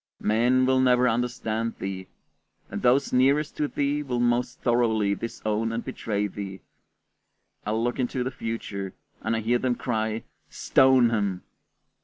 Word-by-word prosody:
Men 120 Hz, +4 st, +3 dB
will 130 Hz, 0 st, +3 dB
never 125 Hz, -1 st, +4 dB
understand 115 Hz, -1 st, -1 dB
thee, 95 Hz, -1 st, -5 dB, 0.6 s
and -, -, -4 dB
those 130 Hz, +3 st, +3 dB
nearest 140 Hz, +4 st, +3 dB
to 150 Hz, -, +1 dB
thee 145 Hz, +1 st, -1 dB
will 125 Hz, -4 st, -2 dB
most 120 Hz, +1 st, 0 dB
thoroughly 110 Hz, -4 st, +2 dB
disown 110 Hz, +1 st, -2 dB
and 115 Hz, +1 st, -3 dB
betray 105 Hz, -2 st, -2 dB
thee; 95 Hz, -1 st, -6 dB, 1.1 s
I 105 Hz, -, 0 dB
look 120 Hz, +3 st, -1 dB
into 125 Hz, 0 st, -1 dB
the 130 Hz, -, -3 dB
future, 100 Hz, -5 st, -5 dB, 0.3 s
and 110 Hz, +2 st, 0 dB
I 110 Hz, -, -1 dB
hear 120 Hz, +3 st, +1 dB
them 125 Hz, -1 st, 0 dB
cry, 110 Hz, -2 st, -2 dB, 0.3 s
"Stone 130 Hz, -3 st, +4 dB
him!" 100 Hz, -5 st, -1 dB
120 Hz, 145 wpm, -26 LUFS, 110-125 Hz, 1.1 s, never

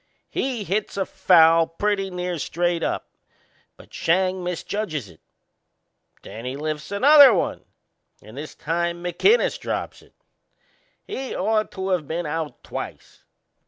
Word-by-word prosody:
He 250 Hz, -5 st, -2 dB
hits 200 Hz, +1 st, -2 dB
a 195 Hz, -, 0 dB
foul 165 Hz, -3 st, +5 dB
pretty 195 Hz, +2 st, -1 dB
near 180 Hz, -2 st, -4 dB
straight 175 Hz, +3 st, -1 dB
up, -, -, -3 dB, 0.7 s
but -, -, -17 dB
Schang 185 Hz, +2 st, +1 dB
misjudges 175 Hz, -, -3 dB
it. 80 Hz, -, -19 dB, 1.0 s
Then 115 Hz, -, -9 dB
he 125 Hz, +2 st, -4 dB
lifts 155 Hz, +1 st, -4 dB
another 280 Hz, +6 st, +8 dB
one -, -, -2 dB, 0.6 s
and 110 Hz, +3 st, -14 dB
this 150 Hz, +3 st, -8 dB
time 170 Hz, +2 st, -2 dB
McInnes 410 Hz, -, +2 dB
drops -, -, -4 dB
it. -, -, -23 dB, 0.9 s
He'd 270 Hz, -, -5 dB
ought 215 Hz, +2 st, 0 dB
to 190 Hz, 0 st, -3 dB
of 170 Hz, -6 st, 0 dB
been 170 Hz, +2 st, -3 dB
out 155 Hz, 0 st, -4 dB
twice. -, -, -8 dB
175 Hz, 130 wpm, -23 LUFS, 160-200 Hz, 1.0 s, another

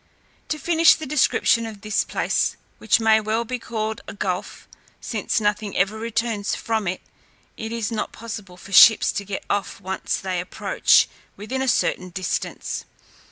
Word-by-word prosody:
To 305 Hz, -, -1 dB
finish 330 Hz, +1 st, +5 dB
the 315 Hz, -, -7 dB
description 260 Hz, -5 st, +2 dB
of 210 Hz, -3 st, -10 dB
this 215 Hz, -1 st, 0 dB
place, -, -, -1 dB, 0.2 s
which -, -, +3 dB
may 220 Hz, -1 st, +4 dB
well 220 Hz, +2 st, -1 dB
be 250 Hz, +2 st, -4 dB
called 220 Hz, -2 st, -4 dB
a -, -, -7 dB
gulf, 185 Hz, -2 st, -4 dB, 0.3 s
since -, -, -1 dB
nothing 205 Hz, -1 st, -1 dB
ever 195 Hz, +4 st, +2 dB
returns 225 Hz, -1 st, -2 dB
from 220 Hz, -3 st, -2 dB
it, 185 Hz, +1 st, -2 dB, 0.5 s
it 220 Hz, 0 st, -6 dB
is 230 Hz, -2 st, -2 dB
not 220 Hz, -, -3 dB
possible 210 Hz, -5 st, -8 dB
for 195 Hz, -, -13 dB
ships 220 Hz, +3 st, +8 dB
to 200 Hz, -, -3 dB
get 200 Hz, 0 st, -5 dB
off 205 Hz, -1 st, -2 dB
when 190 Hz, +1 st, -4 dB
once -, -, -1 dB
they 185 Hz, -2 st, -2 dB
approach 180 Hz, -, +3 dB, 0.3 s
within 215 Hz, +6 st, -4 dB
a 265 Hz, -, -1 dB
certain 185 Hz, -5 st, +1 dB
distance. 185 Hz, +1 st, -3 dB
220 Hz, 165 wpm, -23 LUFS, 200-230 Hz, 0.5 s, ships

